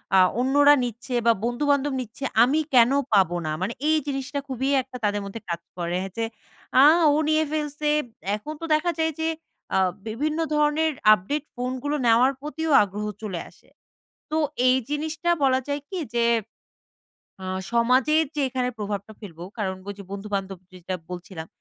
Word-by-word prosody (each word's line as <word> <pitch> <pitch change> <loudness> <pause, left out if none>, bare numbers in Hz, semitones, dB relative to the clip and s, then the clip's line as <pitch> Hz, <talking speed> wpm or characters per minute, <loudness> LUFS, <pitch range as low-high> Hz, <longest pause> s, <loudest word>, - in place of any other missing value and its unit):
আ - - +7 0.2
অন্যরা 285 +3 +5
নিচ্ছে 245 +2 -5
বা 230 - +6
বন্ধুবান্ধব 280 +3 +1
নিচ্ছে 245 +3 -9 0.2
আমি 285 +6 +2
কেন 240 +1 +6 0.2
পাবো 185 -4 +4
না? 155 - -1
মানে 205 +5 -1 0.2
এই 315 - +4
জিনিসটা 280 +1 -3
খুবই 265 +1 -2
একটা 255 0 -10
তাদের 205 0 0
মধ্যে 200 +3 -7
কাজ 170 0 -3 0.2
করে 175 +1 -1 0.2
যে 230 - 0 0.6
"আ - - +8 0.3
ও - - +2
নিয়ে 310 0 +3
ফেলছে" 300 -1 -2 0.5
এখন 300 +9 -7
তো - - -3
দেখা 345 +3 +2
যায় 320 0 +2
যে 320 - 0 0.5
আ - - +4 0.3
বিভিন্ন 300 +8 -2
ধরনের 300 +1 +2 0.2
আপডেট 265 +9 -1
ফোনগুলো 255 +4 -2
নেওয়ার 240 +4 +5
প্রতিও 310 +1 -3
আগ্রহ 205 +2 -5 0.2
চলে 190 -5 -4
আসে। - - -24 0.6
তো 310 - -1 0.3
এই 255 - +5
জিনিসটা 310 +3 -1
বলা 260 -1 +3
যায় 285 0 -1
কি? 375 - -4 0.2
যে 235 - +3 1.2
আ - - -5 0.3
সমাজের 260 +7 +3
যে - - 0
এখানে 250 -1 -1
প্রভাবটা 205 +1 -4
ফেলবো 175 -4 -9
কারণ 190 -2 -2
বলছি 200 0 -7
বন্ধুবান্ধব 195 -2 -4
যেটা 185 0 -6 0.2
বলছিলাম 175 -2 -7
255 Hz, 160 wpm, -24 LUFS, 205-295 Hz, 1.2 s, আ